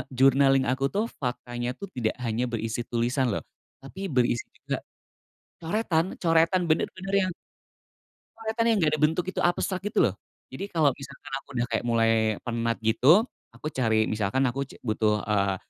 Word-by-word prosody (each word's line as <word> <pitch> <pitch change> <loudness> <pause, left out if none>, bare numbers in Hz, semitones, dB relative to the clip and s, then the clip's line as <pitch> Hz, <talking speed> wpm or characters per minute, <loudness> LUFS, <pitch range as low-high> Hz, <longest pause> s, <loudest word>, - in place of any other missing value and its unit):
journaling 135 0 +5
aku 135 +1 +1
tuh 210 +7 -1
faktanya 120 -1 -3
tuh 200 -2 -8
tidak 115 -3 -1
hanya 120 +2 0
berisi 115 0 -3
tulisan 125 +2 0
loh, 105 - -2 0.4
tapi 190 +8 -6
berisi 125 -4 +1
juga, - - -4 0.8
coretan 170 -1 0
coretan 165 +2 +3
bener-bener 185 +4 -1
yang - - -3 1.0
coretan 225 +1 -1
yang 225 -2 +4
gak 150 - +3
ada - - -6
bentuk 160 +3 +2
itu - - -4
abstrak 180 +1 +1
gitu 210 - 0
loh, - - +1 0.4
jadi 200 - -5
kalau 155 -7 +3
misalkan 135 0 -11
aku - - -42
udah 120 0 +1
kayak - - -1
mulai 115 -1 +3 0.3
penat 115 -1 -1
gitu 130 - +5 0.3
aku 155 - -5
cari 110 -4 +2
misalkan 110 +5 0
aku 135 +2 -1
c - - -14
butuh, 110 -2 +1
eee, 100 -2 +1
135 Hz, 160 wpm, -27 LUFS, 115-170 Hz, 1.0 s, journaling